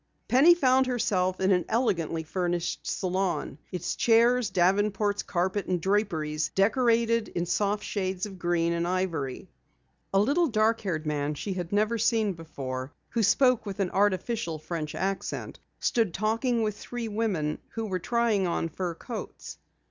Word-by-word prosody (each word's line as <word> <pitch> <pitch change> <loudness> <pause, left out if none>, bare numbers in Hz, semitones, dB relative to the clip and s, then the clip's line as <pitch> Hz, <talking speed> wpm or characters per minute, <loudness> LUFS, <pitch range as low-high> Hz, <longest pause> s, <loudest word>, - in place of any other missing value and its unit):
Penny 305 +8 +6
found 260 -4 +3
herself 185 -7 0
in 190 +1 +2
an 180 -2 +3
elegantly 170 -9 0
furnished 175 +1 -2
salon, 185 -5 -1
its 180 -3 -3
chairs, 235 0 +4
davenports, 200 +3 +2
carpet 190 +2 -1
and 180 -1 0
draperies 165 -6 0
decorated 230 +2 +2
in 175 - -3
soft 205 +3 0
shades 190 -2 -2
of 195 -3 -9
green 170 -1 +1
and 170 0 -1
ivory. 170 -8 -2 0.6
A 195 - +3
little 290 - +3
dark 225 -2 +2
haired 165 -6 -3
man 150 0 -1
she 195 +6 -4
had 180 -2 -5
never 215 +3 +1
seen 220 -2 +2
before, 135 -5 -6 0.2
who 235 - 0
spoke 245 +2 +3
with 200 0 -5
an 190 -3 0
artificial 200 -2 0
French 155 -1 -5
accent, 195 0 -3 0.2
stood 225 - +1
talking 230 +3 +1
with 210 -1 -1
three 240 +1 -5
women 205 -9 -1 0.2
who 225 -1 -2
were 190 -3 -2
trying 225 -1 +1
on 165 -1 -1
fur 175 +1 -4
coats. 230 +4 -8
195 Hz, 150 wpm, -27 LUFS, 175-225 Hz, 0.6 s, Penny